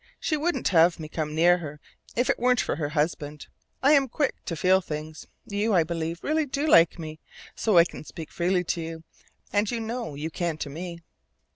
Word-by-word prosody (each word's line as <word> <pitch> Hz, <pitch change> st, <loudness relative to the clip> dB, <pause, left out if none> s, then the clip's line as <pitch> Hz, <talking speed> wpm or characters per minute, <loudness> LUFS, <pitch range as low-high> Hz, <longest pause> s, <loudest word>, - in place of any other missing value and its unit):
She 310 Hz, -, 0 dB
wouldn't 335 Hz, +4 st, 0 dB
have 170 Hz, -1 st, +4 dB
me 155 Hz, -, -6 dB
come 155 Hz, -1 st, -4 dB
near 175 Hz, +2 st, +5 dB
her 150 Hz, -3 st, -7 dB, 0.4 s
if 245 Hz, +2 st, +1 dB
it -, -, +1 dB
weren't 250 Hz, 0 st, +3 dB
for -, -, -1 dB
her 145 Hz, -3 st, -2 dB
husband. 150 Hz, -1 st, -2 dB, 0.4 s
I 280 Hz, -, +6 dB
am 275 Hz, -3 st, +4 dB
quick 285 Hz, +3 st, 0 dB
to 170 Hz, -, -3 dB
feel 185 Hz, +3 st, +3 dB
things. 155 Hz, -2 st, -7 dB, 0.2 s
You, 205 Hz, +1 st, 0 dB
I 170 Hz, -, +5 dB
believe, 165 Hz, +1 st, -4 dB
really 310 Hz, 0 st, +1 dB
do 280 Hz, +3 st, -1 dB
like 170 Hz, -, +5 dB
me 155 Hz, -2 st, -7 dB
a -, -, -50 dB
little, -, -, -19 dB
so 215 Hz, -5 st, +2 dB
I 170 Hz, -, +9 dB
can -, -, -8 dB
speak 160 Hz, 0 st, -9 dB
freely 180 Hz, +1 st, +1 dB
to 170 Hz, 0 st, -2 dB
you. 160 Hz, 0 st, -6 dB, 0.5 s
And 205 Hz, 0 st, +2 dB
you 235 Hz, -, -2 dB
know 225 Hz, -, -4 dB
you 155 Hz, +3 st, -4 dB
can 170 Hz, -2 st, -2 dB
to 145 Hz, -2 st, -5 dB
me." 170 Hz, +2 st, -7 dB
170 Hz, 220 wpm, -26 LUFS, 160-225 Hz, 0.5 s, I